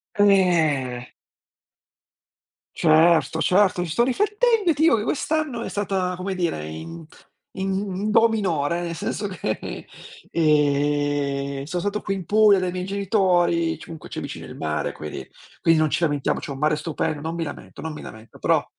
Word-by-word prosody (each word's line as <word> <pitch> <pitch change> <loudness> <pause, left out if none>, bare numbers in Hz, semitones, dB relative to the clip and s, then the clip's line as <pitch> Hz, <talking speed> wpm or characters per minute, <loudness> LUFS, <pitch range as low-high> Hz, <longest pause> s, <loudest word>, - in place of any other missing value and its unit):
Eh. 160 -11 +2 1.7
Certo, 160 -2 +4
certo. 185 -1 +3
Ci 170 - -5
sto 235 - +3
riflettendo 415 - +2
e - - +2
ti 300 - -4
dico 325 - +6
che 210 - -2
quest'anno 295 -1 -1
è - - -4
stata, 190 -3 -1
come 190 +2 -3
dire, 170 - -2
in 80 - -8 0.5
in 195 +1 -2
do 225 +2 +5
minore, 170 -7 0
nel 170 -1 -4
senso 205 +5 -3
che, 170 - -4 0.5
ehm, 145 -2 +1
so' 175 +4 -3
stato 205 +3 -2
qui 195 - -2
in 190 -3 -6
Puglia 210 +1 +5
dai 185 -1 -1
miei 180 0 -4
genitori, 180 -4 +1
ci - - -12
comunque 160 -2 -10
c'è - - -5
vicino - - -7
il - - -10
mare 75 -1 -2
quindi 75 0 -8 0.3
quindi 165 -1 +4
non 155 -2 +2
ci - - 0
lamentiamo, 145 -4 0
c'è - - -8
un 140 - -5
mare 150 +2 +2
stupendo, 155 -1 -3
non 160 +2 -4
mi 170 - -2
lamento 145 - -9
non 160 -1 -4
mi 150 - -8
lamento, 110 +1 -12
però - - +2
170 Hz, 170 wpm, -23 LUFS, 150-200 Hz, 1.7 s, dico